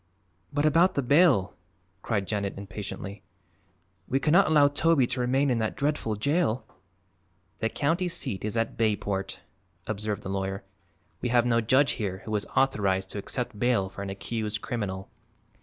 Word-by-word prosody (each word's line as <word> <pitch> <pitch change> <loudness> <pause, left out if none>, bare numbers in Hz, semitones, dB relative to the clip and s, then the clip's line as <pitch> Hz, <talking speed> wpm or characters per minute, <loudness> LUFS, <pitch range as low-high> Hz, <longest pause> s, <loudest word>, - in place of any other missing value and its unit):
"But 145 +1 0
about 165 +5 +4
the 140 - +1
bail," 140 - +4 0.5
cried 100 -4 -1
Janet 100 -1 -2
impatiently. 100 0 -7 0.9
"We 135 - +1
cannot 165 +7 +4
allow 150 -2 +6
Toby 145 -1 +3
to 125 +1 -3
remain 130 +3 +2
in 120 - +1
that 110 -1 -1
dreadful 140 -6 -1
jail!" 140 - 0 0.9
"The 110 - 0
county 165 +9 0
seat 130 - -3
is 110 +2 -2
at 115 - -1
Bayport," 100 -4 -1 0.4
observed 105 0 -3
the - - -6
lawyer. 95 0 -3 0.6
"We 125 - -1
have 120 0 +3
no 115 -1 +3
judge 130 +5 +3
here 95 -1 -3
who 110 -1 -2
is 105 - -1
authorized 95 -8 +1
to 105 - -3
accept 120 0 -4
bail 120 -6 +2
for 100 - -9
an 100 - -4
accused 105 +2 -3
criminal. 95 -5 -3
115 Hz, 155 wpm, -27 LUFS, 100-140 Hz, 0.9 s, allow